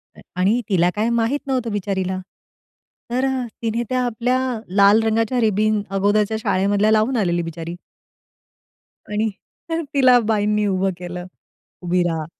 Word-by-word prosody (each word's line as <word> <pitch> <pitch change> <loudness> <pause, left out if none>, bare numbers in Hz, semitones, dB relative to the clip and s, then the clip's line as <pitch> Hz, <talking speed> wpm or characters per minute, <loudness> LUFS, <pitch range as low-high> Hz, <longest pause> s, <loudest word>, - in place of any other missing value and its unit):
अ, - - -15 0.2
आणि 210 +7 +2
तिला 180 -3 +3
काय 220 +3 0
माहीत 235 +4 +1
नव्हतं 250 -4 -1
बिचारीला. 190 -2 -2 0.9
तर 255 +2 +1 0.4
तिने 230 +1 -1
त्या 255 0 +1
आपल्या 245 +2 0 0.4
लाल 200 +2 +6
रंगाच्या 225 +2 +1
रिबीन 215 0 +2
अगोदरच्या 205 +2 +2
शाळेमधल्या 200 +1 +2
लावून 220 +4 +2
आलेली 175 -4 +1
बिचारी. 165 +1 -6 1.4
आणि 215 +1 0 0.4
तर 330 0 -1
तिला 255 -3 +6
बाईंनी 210 -1 +1
उभं 190 0 +1
केलं, 180 0 -6 0.6
"उभी 180 0 +1
राहा!" 160 -2 -2
210 Hz, 130 wpm, -21 LUFS, 190-230 Hz, 1.4 s, लाल